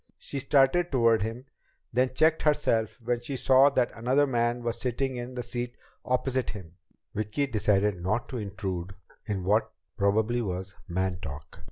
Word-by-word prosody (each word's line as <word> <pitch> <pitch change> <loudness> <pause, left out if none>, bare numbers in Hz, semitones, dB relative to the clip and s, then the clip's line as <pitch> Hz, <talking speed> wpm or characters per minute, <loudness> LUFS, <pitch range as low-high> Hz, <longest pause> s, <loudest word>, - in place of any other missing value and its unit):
She 140 - -5
started 140 +5 +3
toward 115 -5 +4
him, 115 +4 -4 0.5
then 130 +2 +1
checked 160 +2 +4
herself 145 -8 +1
when 120 +1 0
she 135 +2 -4
saw 130 +2 +6
that 130 -3 +1
another 130 +5 +2
man 120 -2 0
was 115 0 -3
sitting 130 +1 -1
in 120 +1 -6
the 125 - -3
seat 120 0 -4 0.3
opposite 130 0 0
him. 90 -6 -8 0.4
Vicki 110 +7 -1
decided 105 -5 +1
not 105 +7 -1
to 125 - -4
intrude 95 -2 -4 0.3
in 100 -4 -2
what 105 +4 +2 0.3
probably 110 +4 +2
was 95 -2 -4 0.2
"man 95 0 -1
talk." 75 -2 -8
120 Hz, 160 wpm, -28 LUFS, 100-130 Hz, 0.5 s, saw